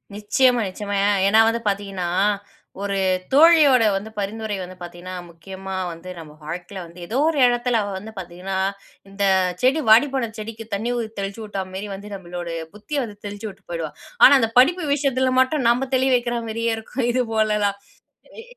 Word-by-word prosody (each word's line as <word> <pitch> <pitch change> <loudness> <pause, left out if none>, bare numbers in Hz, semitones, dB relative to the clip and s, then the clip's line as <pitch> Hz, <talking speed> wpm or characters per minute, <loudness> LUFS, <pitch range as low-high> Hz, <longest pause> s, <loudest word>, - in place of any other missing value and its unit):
நிச்சயமா, 235 +4 +2
நிச்சயமா. 200 +2 -4 0.3
ஏனா, 215 +3 +5
வந்து 230 +1 -2
பாத்தீங்கன்னா 195 -3 -3 0.7
ஒரு 200 -1 -2 0.4
தோழியோட 295 -5 +7
வந்து 200 +3 -4
பரிந்துரை 210 +1 -3
வந்து 185 0 -8
பார்த்தீங்கன்னா, 175 +1 -8
முக்கியமா 190 +3 -9 0.2
வந்து, 165 +2 -10
நம்ம 155 -2 -11
வாழ்க்கையில 180 +4 -6
வந்து 170 +1 -14
ஏதோ 235 - -2
ஒரு 310 -3 -1
இடத்துல 240 -1 +1
அவ 205 - -4
வந்து 210 +4 -9
பாத்தீங்கன்னா, 185 +2 -5 0.5
இந்த 195 +1 -4 0.4
செடி 265 +5 +3
வாடிப்போன 255 +1 +4
செடிக்கு 220 +1 -7
தண்ணி 220 +5 -1
ஊ - - -1 0.2
தெளிச்சு 200 +3 -4
விட்டா 200 -2 -4
மாரி 195 +2 -5
வந்து 205 +2 -10
நம்மளோட 175 -2 -7 0.3
புத்திய 275 +7 -3
வந்து 210 -3 -8
தெளிச்சி 205 +1 -6
விட்டு 195 - -16
போயிடுவா. 165 -3 -3 0.3
ஆனா, 280 - +10
அந்த 225 0 0
படிப்பு 330 +6 +4
விஷயத்துல 260 -2 +1
மட்டும் 260 0 0
நாம 250 +3 +1
தெளி 260 +1 +2
வைக்கிற 240 -1 -1
மாரியே 230 +1 -1
இருக்கும், 240 +3 -3
இது 255 0 +2
போலலாம். 210 -2 +1 0.6
எ - - -10
210 Hz, 165 wpm, -22 LUFS, 190-245 Hz, 0.7 s, ஆனா